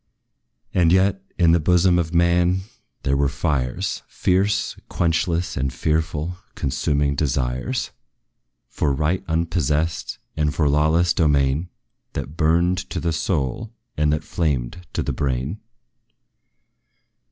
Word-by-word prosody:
And 85 Hz, -3 st, +4 dB
yet, 95 Hz, +1 st, +3 dB, 0.2 s
in 85 Hz, -3 st, +5 dB
the 85 Hz, -, +4 dB
bosom 90 Hz, +2 st, +4 dB
of 80 Hz, -2 st, -1 dB
man 85 Hz, +2 st, +3 dB, 0.4 s
there 70 Hz, -, +1 dB
were 70 Hz, 0 st, +2 dB
fires 70 Hz, -3 st, -1 dB
Fierce, 95 Hz, +3 st, +1 dB
quenchless 85 Hz, +1 st, 0 dB
and 65 Hz, 0 st, -1 dB
fearful 80 Hz, +4 st, -1 dB, 0.2 s
consuming 70 Hz, +2 st, 0 dB
desires 65 Hz, -3 st, -1 dB, 0.8 s
For 70 Hz, -, 0 dB
right 75 Hz, +6 st, 0 dB
unpossessed, 80 Hz, -1 st, 0 dB, 0.2 s
and 75 Hz, -2 st, 0 dB
for 75 Hz, -1 st, +2 dB
lawless 80 Hz, +4 st, +3 dB
domain, 75 Hz, +1 st, +2 dB, 0.4 s
That 70 Hz, +2 st, -5 dB
burned 85 Hz, +3 st, +2 dB
to -, -, -3 dB
the 85 Hz, -1 st, -1 dB
soul, 85 Hz, -, -2 dB, 0.2 s
and 75 Hz, 0 st, +2 dB
that 75 Hz, +1 st, 0 dB
flamed 80 Hz, +1 st, -2 dB
to -, -, -1 dB
the -, -, -2 dB
brain. 70 Hz, +7 st, -2 dB
80 Hz, 120 wpm, -22 LUFS, 70-85 Hz, 0.8 s, in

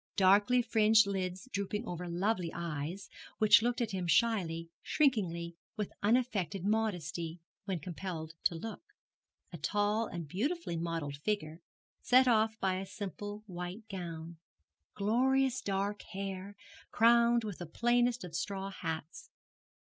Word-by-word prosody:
Darkly 205 Hz, +6 st, +5 dB
fringed 220 Hz, -2 st, +5 dB
lids 190 Hz, +2 st, -3 dB
drooping 205 Hz, +3 st, -2 dB
over 175 Hz, 0 st, -4 dB
lovely 180 Hz, 0 st, 0 dB
eyes, 170 Hz, +3 st, -4 dB, 0.3 s
which 210 Hz, -2 st, +7 dB
looked 245 Hz, +1 st, 0 dB
at 225 Hz, -2 st, -1 dB
him 185 Hz, -2 st, -2 dB
shyly, 165 Hz, -3 st, +1 dB
shrinkingly, 175 Hz, -, +1 dB, 0.2 s
with 210 Hz, -2 st, -3 dB
unaffected 205 Hz, -6 st, +1 dB
modesty, 180 Hz, -6 st, -1 dB, 0.3 s
when 190 Hz, -3 st, -1 dB
compelled 165 Hz, -1 st, -5 dB
to 170 Hz, -, +3 dB
look. 215 Hz, +6 st, -6 dB, 0.7 s
A -, -, -6 dB
tall 210 Hz, +2 st, +1 dB
and 170 Hz, -3 st, -6 dB
beautifully 270 Hz, -, -2 dB
modelled 165 Hz, -4 st, -3 dB
figure, 165 Hz, -1 st, -2 dB, 0.4 s
set 255 Hz, +1 st, +5 dB
off 220 Hz, -1 st, +3 dB
by 185 Hz, -1 st, +1 dB
a 195 Hz, -, -4 dB
simple 205 Hz, +1 st, -6 dB
white 180 Hz, +3 st, -7 dB
gown; 170 Hz, -3 st, -6 dB, 0.6 s
glorious 260 Hz, +5 st, +2 dB
dark 200 Hz, +1 st, -1 dB
hair, 195 Hz, 0 st, -5 dB, 0.3 s
crowned 235 Hz, +1 st, +5 dB
with 210 Hz, -4 st, -5 dB
the 175 Hz, -, -6 dB
plainest 240 Hz, +6 st, +2 dB
of 175 Hz, -2 st, -8 dB
straw 195 Hz, +3 st, -3 dB
hats. 165 Hz, -, -5 dB
195 Hz, 130 wpm, -33 LUFS, 170-225 Hz, 0.7 s, which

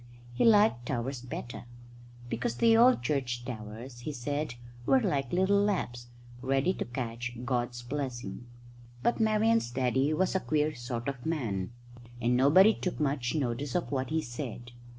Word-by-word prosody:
He -, -, +1 dB
liked 210 Hz, -, +5 dB
towers 130 Hz, 0 st, -2 dB
better, 120 Hz, -1 st, -7 dB, 0.6 s
because 120 Hz, 0 st, -2 dB
the 225 Hz, -, +5 dB
old 240 Hz, -, +5 dB
church 125 Hz, -3 st, -1 dB
towers, 120 Hz, +1 st, -7 dB
he 135 Hz, +5 st, -4 dB
said, 145 Hz, 0 st, -3 dB, 0.3 s
were 265 Hz, -, +5 dB
like 145 Hz, -, -1 dB
little 190 Hz, +3 st, +3 dB
laps, 120 Hz, -13 st, -1 dB, 0.3 s
ready 135 Hz, +7 st, +1 dB
to -, -, -4 dB
catch 120 Hz, 0 st, -4 dB
God's 120 Hz, -1 st, -1 dB
blessing. 125 Hz, -2 st, -5 dB, 0.6 s
But 240 Hz, -, +2 dB
Marian's 220 Hz, -, +3 dB
daddy 130 Hz, +3 st, +1 dB
was 180 Hz, +4 st, +1 dB
a 190 Hz, -, +2 dB
queer 155 Hz, -2 st, 0 dB
sort 120 Hz, -2 st, -5 dB
of 135 Hz, -3 st, -4 dB
man, 115 Hz, -, -2 dB, 0.5 s
and 120 Hz, +1 st, +2 dB
nobody 170 Hz, -, +6 dB
took 180 Hz, -, -4 dB
much 135 Hz, -4 st, 0 dB
notice 135 Hz, -1 st, -2 dB
of 175 Hz, -, -1 dB
what 130 Hz, -2 st, -1 dB
he 160 Hz, 0 st, 0 dB
said. 120 Hz, -1 st, -6 dB
130 Hz, 150 wpm, -30 LUFS, 120-160 Hz, 0.6 s, nobody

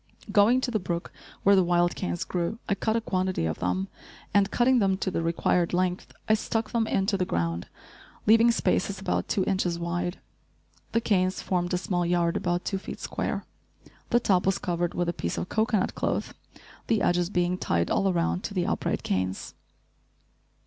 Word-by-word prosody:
Going 225 Hz, +5 st, +5 dB
to 255 Hz, -, -1 dB
the 215 Hz, -, +1 dB
brook 175 Hz, -2 st, -4 dB, 0.3 s
where 200 Hz, 0 st, +6 dB
the 190 Hz, -, +5 dB
wild 175 Hz, 0 st, +2 dB
canes 85 Hz, 0 st, -2 dB
grew, 175 Hz, +4 st, -2 dB
I 200 Hz, -, +2 dB
cut 220 Hz, +2 st, 0 dB
a 230 Hz, -, +1 dB
quantity 185 Hz, -, -1 dB
of 80 Hz, -, -2 dB
them 90 Hz, +2 st, -1 dB, 0.5 s
and, 200 Hz, -1 st, +4 dB
cutting 250 Hz, +3 st, +3 dB
them 195 Hz, -3 st, +2 dB
to 190 Hz, -, -2 dB
the 165 Hz, -, -1 dB
required 170 Hz, +1 st, +1 dB
length, 180 Hz, 0 st, -1 dB, 0.2 s
I 215 Hz, -, +4 dB
stuck 220 Hz, +1 st, -1 dB
them 230 Hz, -2 st, +1 dB
into 195 Hz, 0 st, +1 dB
the 185 Hz, -, +1 dB
ground, 85 Hz, -, -2 dB, 0.6 s
leaving 225 Hz, +2 st, +6 dB
spaces 200 Hz, -4 st, +1 dB
about 195 Hz, -, -1 dB
two 190 Hz, -, +1 dB
inches 185 Hz, -3 st, 0 dB
wide. 175 Hz, +1 st, -2 dB, 0.8 s
The 230 Hz, -, +2 dB
canes 185 Hz, -4 st, +1 dB
formed 175 Hz, -1 st, -1 dB
a -, -, +1 dB
small 180 Hz, -1 st, -1 dB
yard 170 Hz, -1 st, +1 dB
about 175 Hz, -2 st, -1 dB
two 195 Hz, -, -1 dB
feet -, -, -8 dB
square. -, -, -3 dB, 0.6 s
The 240 Hz, -, +4 dB
top 190 Hz, -6 st, +2 dB
was 195 Hz, -, +3 dB
covered 175 Hz, -1 st, -2 dB
with 175 Hz, -1 st, 0 dB
a 170 Hz, -, 0 dB
piece 85 Hz, -, -3 dB
of -, -, -3 dB
cocoanut 220 Hz, -3 st, +1 dB
cloth, -, -, -2 dB, 0.5 s
the 225 Hz, -2 st, +2 dB
edges 175 Hz, 0 st, +2 dB
being 180 Hz, -1 st, 0 dB
tied 85 Hz, 0 st, 0 dB
all 195 Hz, -, +2 dB
around 175 Hz, +1 st, 0 dB
to 200 Hz, -, -5 dB
the 180 Hz, -2 st, +1 dB
upright -, -, -1 dB
canes. 95 Hz, 0 st, -2 dB
185 Hz, 185 wpm, -27 LUFS, 175-205 Hz, 0.8 s, where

